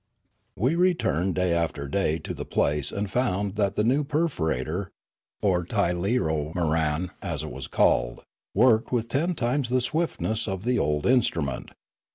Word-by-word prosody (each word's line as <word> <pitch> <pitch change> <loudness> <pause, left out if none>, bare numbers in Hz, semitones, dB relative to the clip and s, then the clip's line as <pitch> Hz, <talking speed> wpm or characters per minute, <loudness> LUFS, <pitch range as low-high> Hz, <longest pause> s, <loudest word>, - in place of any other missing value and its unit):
We 125 - +2
returned 165 - +1
day 90 -2 +1
after 80 -4 -1
day 80 0 0
to 80 - -6
the - - -5
place 75 -1 0
and 100 +1 -2
found 100 -3 0
that 100 -2 0
the 105 - +1
new 135 +6 +2
perforator, 95 - -1 0.6
or 90 -3 +2
tirleomoran 85 -4 0
as 85 -6 -3
it 75 - -6
was - - -6
called, - - +2 0.3
worked 115 +1 +4
with 115 -2 0
ten 165 +9 0
times 125 0 0
the 130 +1 +2
swiftness 125 -4 -1
of 95 0 -3
the 125 +1 +1
old 75 0 0
instru 120 - +3
ment. 70 - -6
95 Hz, 155 wpm, -26 LUFS, 80-125 Hz, 0.6 s, worked